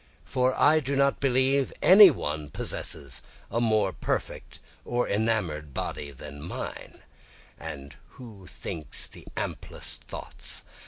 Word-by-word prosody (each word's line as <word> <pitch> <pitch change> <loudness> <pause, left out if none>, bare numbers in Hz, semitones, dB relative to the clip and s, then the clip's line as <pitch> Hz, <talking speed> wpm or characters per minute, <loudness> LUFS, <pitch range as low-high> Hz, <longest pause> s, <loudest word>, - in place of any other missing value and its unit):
for 130 -1 +1
I 155 +1 +6
do 140 -1 -2
not 140 0 +3
believe 135 0 +2
any 195 +1 +10
one 75 - -3
possesses 70 -1 -3 0.3
a 115 +3 0
more 110 -5 +2
perfect - - -3 0.3
or 120 0 0
enamour'd 95 - 0
body 70 - -3
than 70 +1 -9
mine, 85 - -7 0.6
And 70 -3 -7 0.2
who 105 -7 -11
thinks 80 -2 -3
the - - -12
amplest - - -4
thoughts? - - -5
110 Hz, 120 wpm, -27 LUFS, -, 0.6 s, any